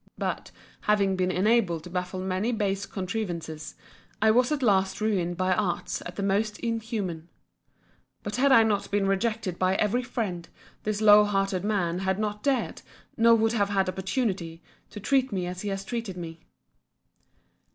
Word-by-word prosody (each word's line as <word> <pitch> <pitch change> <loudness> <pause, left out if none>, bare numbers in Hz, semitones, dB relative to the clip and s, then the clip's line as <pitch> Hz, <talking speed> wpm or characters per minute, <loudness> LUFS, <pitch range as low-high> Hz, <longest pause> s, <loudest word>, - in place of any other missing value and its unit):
But - - -3 0.4
(having 200 -2 +3
been 185 0 0
enabled 185 -4 +2
to 180 - -10
baffle 180 +1 -3
many 190 +5 -1
base 200 -3 -1
contrivances) 175 -6 -4 0.4
I 220 +1 +5
was 245 +4 +3
at 290 -3 0
last 195 -4 +2
ruined 185 -5 0
by 185 0 +2
arts 180 -2 -1
the 200 - -3
most 205 +2 0
inhuman. 215 -8 -3 0.9
But 205 +3 -4
had 275 +2 +4
I 230 -3 +8
not 210 -2 0
been 200 -1 +1
rejected 195 -1 -1
by 185 +1 +2
every 210 +5 +1
friend, 200 -8 -4 0.4
this 215 0 -1
low 210 -1 +8
hearted 195 -2 0
man 185 -5 0
had 190 0 0
not 210 0 -2
dared, 275 -3 0 0.3
nor 230 0 +6
would 225 0 +2
have 200 -3 +1
had 195 -2 +1
opportunity, 190 -4 -2 0.3
to 210 - -8
treat 265 +4 +1
me 185 -3 -1
as 180 +1 -5
he 205 - -3
has 195 0 -4
treated 230 -6 -4
me. 165 -1 -7
200 Hz, 160 wpm, -27 LUFS, 185-220 Hz, 0.9 s, I